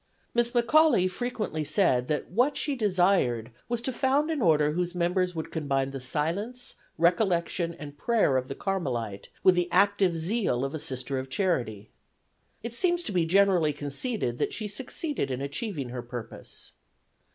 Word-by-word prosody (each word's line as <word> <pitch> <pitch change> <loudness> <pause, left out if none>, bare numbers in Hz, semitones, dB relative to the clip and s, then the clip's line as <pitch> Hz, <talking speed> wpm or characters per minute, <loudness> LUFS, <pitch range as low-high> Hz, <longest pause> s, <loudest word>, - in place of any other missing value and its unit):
Miss 240 0 +2
McAuley 240 - +4
frequently 205 -5 -3
said 130 -8 +2
that 150 0 -2
what 250 +9 +2
she 285 - -1
desired 180 - +2 0.2
was 240 -1 -1
to 260 - -1
found 280 +5 +1
an 305 -4 -1
order 150 -5 +4
whose 175 +2 -2
members 180 +1 0
would 160 - -5
combine 135 -4 -1
the 135 - -5
silence, 170 - -2 0.2
recollection 170 -1 +1
and 145 -3 -10
prayer 225 - +2
of 130 0 0
the 135 - -5
Carmelite 120 - -3
with 185 - +7
the 175 -1 0
active 195 -1 +3
zeal 165 - 0
of 135 - -4
a 155 - -3
Sister 130 0 -2
of 130 0 -6
Charity. 120 - -1 0.7
It 235 0 -5
seems 350 +6 +1
to 220 - -3
be 175 -4 +1
generally 180 -4 +4
conceded 145 - -3
that - - 0
she 215 - -3
succeeded 255 - -3
in 130 -1 -2
achieving 140 - -4
her 125 0 -5
purpose. 120 -2 -8
175 Hz, 165 wpm, -27 LUFS, 140-215 Hz, 0.7 s, with